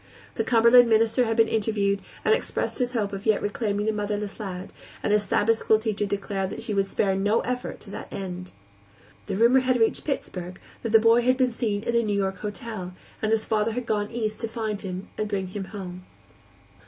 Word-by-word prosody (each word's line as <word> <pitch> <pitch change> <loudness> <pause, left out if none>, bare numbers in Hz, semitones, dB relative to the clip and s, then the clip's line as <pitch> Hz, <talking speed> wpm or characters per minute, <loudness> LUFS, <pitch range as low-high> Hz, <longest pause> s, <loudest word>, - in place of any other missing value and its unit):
The - - -1
Cumberland 235 0 +6
minister 225 +2 +3
had 225 0 -1
been 225 -1 +5
interviewed, 205 -3 0 0.2
and - - +5
expressed 455 - -2
his 250 0 0
hope 205 -4 -1
of 195 +2 -5
yet 215 - +4
reclaiming 205 0 -1
the 220 - +2
motherless 210 -1 -3
lad, 190 -2 -6 0.3
and 205 - +2
his 210 - +4
Sabbath 210 +3 +2
school 220 - +4
teacher 215 -2 -2
declared 195 -1 -2
that - - -6
she 210 - -3
would 195 -1 +1
spare 195 -1 +1
no 205 +4 +2
effort 250 0 -4
to - - -11
that - - -8
end. 180 -1 -6 0.8
The - - -2
rumor 235 +5 +5
had 255 -1 +1
reached 225 - +2
Pittsburgh 180 - -4 0.2
that 230 - -3
the 225 - +8
boy 230 +2 +5
had 255 +1 +2
been 255 -2 +2
seen 215 -3 -1
in 235 - -1
a 235 - +5
New 210 -3 0
York 190 -1 -1
hotel, 210 -4 -6 0.3
and 215 - 0
his 225 -1 +2
father 220 0 +1
had 250 +1 -3
gone 210 -2 -1
East 220 -2 -3
to 230 - -2
find 220 -2 -3
him 185 -1 -5
and 215 -1 -1
bring 195 -3 -2
him 195 +1 -5
home. 185 -3 -8
215 Hz, 215 wpm, -25 LUFS, 200-230 Hz, 0.8 s, the